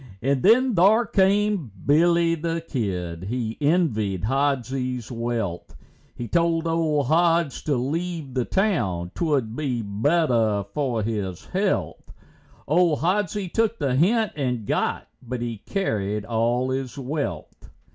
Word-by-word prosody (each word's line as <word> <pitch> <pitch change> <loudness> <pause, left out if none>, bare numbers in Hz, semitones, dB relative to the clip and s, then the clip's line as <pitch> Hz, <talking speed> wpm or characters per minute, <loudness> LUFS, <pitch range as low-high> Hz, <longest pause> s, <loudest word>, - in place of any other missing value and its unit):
And 135 +3 0
then 250 +5 +4
thar 210 +6 +5
came 195 - +2
Billy 170 +3 +4
the 165 0 -3
Kid, 90 - -3
he 115 +1 -3
envied 115 - +1
Hodsie's 130 -1 -1
wealth, 115 -7 -3 0.4
He 120 - -5
told 165 +4 +1
old 160 -3 +1
Hods 165 0 +2
to 145 - +1
leave 155 +2 -3
the 125 -1 0
town, 95 - 0
'twould 140 -9 0
be 125 -6 -2
better 110 - +1
for 130 -7 -1
his 100 -5 -3
health; - - -2 0.6
Old 165 0 +3
Hodsie 190 +2 0
took 225 0 +1
the 140 -4 0
hint 215 - +2
and 125 -6 -2
got, - - -1
but 125 0 -5
he 115 -2 -4
carried 105 - -1
all 120 +3 0
his 130 -1 -3
wealth. 140 +2 -5
140 Hz, 125 wpm, -24 LUFS, 115-170 Hz, 0.6 s, thar